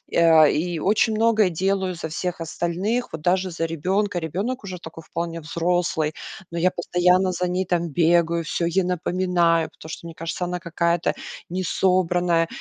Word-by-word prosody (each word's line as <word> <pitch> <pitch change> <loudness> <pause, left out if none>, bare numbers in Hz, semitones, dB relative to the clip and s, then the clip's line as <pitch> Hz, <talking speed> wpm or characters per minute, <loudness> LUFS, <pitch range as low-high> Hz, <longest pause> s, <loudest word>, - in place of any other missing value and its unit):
а, 165 -2 +7
и 165 +3 0
очень 215 +5 +2
многое 220 -3 +3
делаю 190 +1 -1
за 160 -1 -5
всех 170 +3 -3
остальных, 185 +9 -2
вот 160 - -6
даже 185 +2 +1
за 165 0 -2
ребёнка. 185 +6 -1
Ребёнок 200 - -3
уже 185 -2 -6
такой 165 -1 -10
вполне 165 0 -4
взрослый, 165 -1 0 0.4
но 170 - -5
я 185 - +4
постоянно 180 +2 +2
за 180 +1 -1
ней 185 +1 -1
там 170 -1 0
бегаю, 170 +2 +2
всё 170 - -1
ей 185 +3 +1
напоминаю, 175 -2 +1
потому 160 - -13
что, 160 - -7
мне 165 - -8
кажется, 165 +2 -4
она 180 0 -3
какая-то 170 0 0 0.4
несобранная. 175 -2 +1
175 Hz, 160 wpm, -23 LUFS, 165-185 Hz, 0.4 s, а